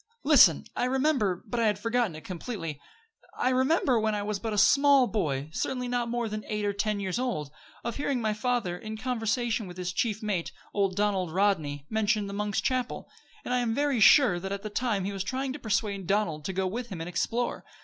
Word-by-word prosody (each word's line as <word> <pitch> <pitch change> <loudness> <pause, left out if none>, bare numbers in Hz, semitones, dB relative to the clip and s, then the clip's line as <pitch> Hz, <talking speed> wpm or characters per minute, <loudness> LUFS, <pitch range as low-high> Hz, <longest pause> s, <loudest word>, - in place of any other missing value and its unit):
"Listen; 270 - +6
I - - 0
remember 260 - +1
but 240 - -3
I 230 - +3
had 210 -2 +1
forgotten 230 -4 0
it 155 - -10
completely 170 - -5 0.6
I 255 - +2
remember, 260 -1 +2
when 215 -1 0
I 205 - -2
was 210 -1 -2
but 225 +1 -3
a 210 - -2
small 275 +4 +6
boy 150 - -2
certainly 250 +5 -2
not 245 -1 -1
more 240 -1 -1
than 215 0 -5
eight 210 -1 -2
or 205 - 0
ten 205 +1 -1
years 190 +2 -2
old 190 - -2 0.3
of 235 -1 -4
hearing 280 -2 -1
my 215 -2 0
father, 225 -5 -1
in 220 +4 -7
conversation 230 -2 -1
with 180 0 -10
his 180 0 -3
chief 215 +2 -1
mate, 195 -5 -2 0.2
old 195 -2 +1
Donald 195 -4 0
Rodney, 160 -7 0
mention 215 0 +1
the 200 - -6
Monk's 205 0 -1
Chapel; 255 -1 -2 0.3
and 250 - -2
I 250 - +2
am 230 -2 0
very 285 -3 +1
sure 215 -4 +6
that 190 +2 -5
at 200 0 -4
that 215 -1 -6
time 215 -6 0
he 200 - -3
was 195 -1 -3
trying 260 +5 -2
to 295 - -7
persuade 200 -5 -1
Donald 180 -7 0
to 190 - -2
go 190 +1 0
with 235 +6 -4
him 185 -5 -6
and 165 - -5
explore. 235 +7 -1
215 Hz, 220 wpm, -28 LUFS, 190-245 Hz, 0.6 s, Listen